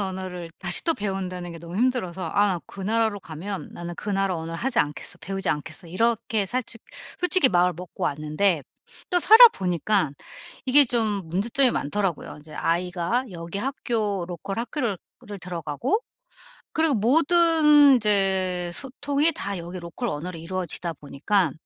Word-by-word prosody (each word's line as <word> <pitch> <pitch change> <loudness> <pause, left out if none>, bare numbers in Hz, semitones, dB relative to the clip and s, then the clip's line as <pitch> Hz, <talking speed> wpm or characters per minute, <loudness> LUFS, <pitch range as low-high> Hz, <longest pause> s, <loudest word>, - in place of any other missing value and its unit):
언어를 185 -3 -5
다시 175 -1 +3
또 330 - +2
배운다는 185 -3 -4
게 165 - -9
너무 170 +2 -8
힘들어서 190 -8 -1
'아 205 0 +4
나 180 -3 -1
그 195 - -11
나라로 220 0 0
가면 180 +5 -7
나는 175 0 -7
그 210 - -5
나라 195 -1 0
언어를 165 +1 -6
하지 250 -2 -1
않겠어. 150 +4 -2
배우지 195 0 -4
않겠어.' 155 +4 -3
이렇게 225 +2 0
살죽 230 0 -4 0.4
솔직히 360 -6 +4
마음을 180 -1 +3
먹고 180 -1 -6
왔는데 155 +3 0 0.5
또 355 -1 +3
살아 450 +6 +10
보니깐 180 - -1 0.5
이게 285 +2 +8
좀 215 -7 -1
문제점이 235 +9 +3
많더라고요. 190 +1 -2
인제 150 0 -14
아이가 180 +7 -1
여기 170 +2 -6
학교 220 -7 -2
로컬 185 +4 -6
학교를 235 - -2 0.3
를 205 -1 -7
들어가고 180 - -2 0.7
그리고 315 -4 +2
모든 300 - +5
이제 190 -5 +1
소통이 285 - 0
다 200 - -4
여기 175 +2 -7
로컬 175 +8 -5
언어로 165 +3 -5
이루어지다 170 0 -3
보니까 150 +5 -1
195 Hz, 340 characters per minute, -24 LUFS, 175-235 Hz, 0.7 s, 살아